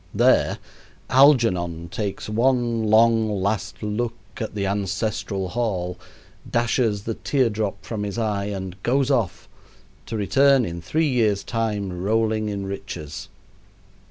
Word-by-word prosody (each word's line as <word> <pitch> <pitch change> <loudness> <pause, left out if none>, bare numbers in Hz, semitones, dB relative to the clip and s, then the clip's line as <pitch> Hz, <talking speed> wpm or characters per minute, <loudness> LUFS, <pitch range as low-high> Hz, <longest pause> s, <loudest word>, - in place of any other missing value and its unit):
There, - - +4 0.5
Algernon 90 - +4
takes 100 +3 -4
one 120 0 +1
long, 110 0 +4
last 100 +2 -2
look 115 +3 -2 0.2
at 110 -2 -5
the 100 -1 -1
ancestral 100 0 -2
hall, 95 -6 -2 0.5
dashes 115 -3 +1
the 115 - -2
tear 130 0 +1
drop 105 -2 -3
from 110 -3 -4
his 105 +1 -4
eye, 105 -3 -1
and 95 -2 -5
goes 135 +5 +1
off 115 -10 0 0.6
to 110 - -3
return 135 +5 +4
in 85 -2 -5
three 155 - 0
years' 110 -7 +1
time, 105 -6 -2
rolling 110 +1 +1
in 100 -1 -3
riches. 90 -6 -6
105 Hz, 130 wpm, -23 LUFS, 100-115 Hz, 0.6 s, There